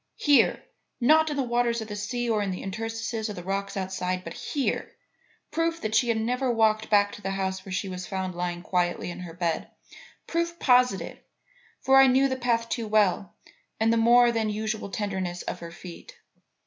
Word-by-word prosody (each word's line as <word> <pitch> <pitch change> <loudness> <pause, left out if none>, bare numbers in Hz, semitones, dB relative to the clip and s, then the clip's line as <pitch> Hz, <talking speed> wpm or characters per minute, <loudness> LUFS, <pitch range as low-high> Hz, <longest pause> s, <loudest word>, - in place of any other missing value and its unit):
Here! 290 -2 +3 0.4
Not 310 +5 +5
in 295 - -3
the 275 - +1
waters 240 -1 +1
of 220 - -6
the 210 - -6
sea 240 +4 -3
or 220 -2 +1
in 200 - -1
the 185 - -4
interstices 225 +2 -4
of 210 - -5
the 175 - -7
rocks 195 +2 -3
outside, 185 -1 -2
but 165 - -7
here! 280 - -2 0.6
Proof 330 0 0
that 215 0 -3
she 240 +2 +3
had 230 -1 +1
never 250 +3 0
walked 220 -1 +2
back 205 -1 +4
to - - -10
the 195 - -3
house 190 -1 -2
where 190 - -10
she 185 +2 -2
was 185 -1 -6
found 190 -2 -3
lying 175 0 -3
quietly 175 -1 -1
in - - -8
her 175 -2 -8
bed; 170 -2 -2 0.6
proof 340 0 -2
positive; 250 - +2 0.6
for 270 0 +5
I 270 0 +8
knew 265 +2 +4
the 260 - -1
path 235 -2 0
too 230 -1 -3
well 205 -3 +1 0.4
and 225 +1 +3
the - - +2
more 240 +1 +5
than 225 -2 0
usual 215 0 -3
tenderness 190 -3 -3
of 180 - -5
her 170 - -8
feet. 175 0 -11
215 Hz, 200 wpm, -26 LUFS, 190-240 Hz, 0.6 s, I